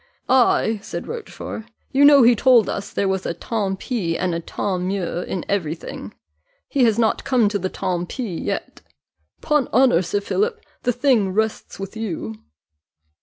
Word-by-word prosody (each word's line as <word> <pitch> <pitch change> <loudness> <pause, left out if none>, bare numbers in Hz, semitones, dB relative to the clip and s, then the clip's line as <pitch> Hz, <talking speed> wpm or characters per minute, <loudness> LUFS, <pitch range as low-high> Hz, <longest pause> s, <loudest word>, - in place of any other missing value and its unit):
"Ay," 240 -4 +3
said - - -6
Rochfort, 445 - -7 0.3
"you 275 +2 +4
know 285 -2 +8
he 240 +1 +7
told 240 -1 +5
us 200 - -4
there 200 - 0
was 190 -1 -1
a 170 - -2
tant 195 0 -2
pis 190 -11 -2
and 180 -1 -1
a 165 - -1
tant 185 +2 -3
mieux 185 -2 -2
in 180 - -4
every 170 -6 -1
thing - - -8 0.6
he's 240 -6 +2
not 225 -2 +1
come 245 -5 +3
to 205 -1 -1
the 185 0 -2
tant 175 -1 -3
pis 220 -10 -4
yet. - - -4 0.6
'Pon 295 -4 +1
honour, 250 -8 +4
Sir 190 +3 -1
Philip, 440 - -1 0.2
the 245 - +1
thing 245 -5 +2
rests 220 +1 -2
with 195 +2 -6
you." 200 - -4
210 Hz, 170 wpm, -22 LUFS, 185-250 Hz, 0.6 s, know